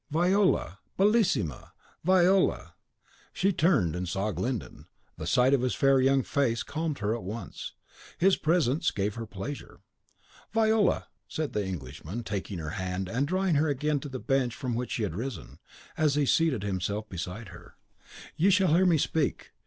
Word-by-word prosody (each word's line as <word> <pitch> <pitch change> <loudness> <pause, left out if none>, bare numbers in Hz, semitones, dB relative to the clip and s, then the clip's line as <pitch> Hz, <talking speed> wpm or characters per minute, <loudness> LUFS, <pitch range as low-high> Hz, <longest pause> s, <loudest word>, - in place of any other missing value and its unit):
"Viola! 175 - +2 0.2
bellissima! 195 - +1 0.3
Viola!" 185 +2 +3 0.6
She 195 +2 +1
turned, 155 - +2
and 90 0 -3
saw 100 +4 -1
Glyndon. 125 -1 -4 0.3
The 80 - -5
sight 125 +8 +4
of 135 - +3
his 125 -1 0
fair 135 -1 +4
young 135 0 +3
face 120 -5 0
calmed 155 -2 -3
her 105 +1 -1
at 120 - -6
once. 100 +1 -7 0.4
His 190 +2 +4
presence 155 -3 +1
gave 100 0 -2
her 115 +1 -6
pleasure. 105 +9 -7 0.7
"Viola," 220 -2 +2 0.2
said 155 -2 -3
the 105 - 0
Englishman, 90 - -6
taking 100 -2 -4
her 80 -2 -5
hand, 95 0 -3
and 125 +7 0
drawing 185 +1 +1
her 150 +2 +3
again 150 +1 0
to 145 - -7
the 130 - -5
bench 130 -2 0
from 130 -3 -3
which 120 +2 -3
she 115 - -1
had 95 -6 -2
risen, 115 +1 -6 0.4
as 150 -3 +2
he 145 -1 +2
seated 140 -7 +2
himself 100 +2 -2
beside 95 +4 -6
her, 85 - -14 0.6
"you 180 +5 +3
shall 185 -4 +4
hear 185 +3 +4
me 170 -3 +4
speak! 155 0 -1
130 Hz, 165 wpm, -28 LUFS, 100-160 Hz, 0.7 s, sight